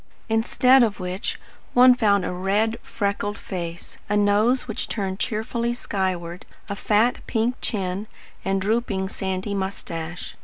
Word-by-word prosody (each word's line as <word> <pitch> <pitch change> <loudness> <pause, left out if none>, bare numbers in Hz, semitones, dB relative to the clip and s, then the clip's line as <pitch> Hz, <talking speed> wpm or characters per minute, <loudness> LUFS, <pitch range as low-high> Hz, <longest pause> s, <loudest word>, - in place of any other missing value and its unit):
Instead 250 +4 +5
of 220 -4 +2
which 185 +2 -3 0.4
one 250 +1 +9
found 205 -6 +3
a - - -2
red, 200 +5 0
freckled 205 -1 -2
face, 170 -5 -6
a 210 - +2
nose 210 +6 +3
which 220 - -3
turned 195 -3 -3
cheerfully 235 +1 -1
skyward, 185 -6 -2 0.2
a 200 - -3
fat 215 +4 +2
pink 230 +1 +1
chin, 195 -1 -2 0.4
and 195 0 +1
drooping 210 -3 0
sandy 190 +1 -3
moustache. 180 -3 -4
205 Hz, 130 wpm, -24 LUFS, 190-225 Hz, 0.4 s, one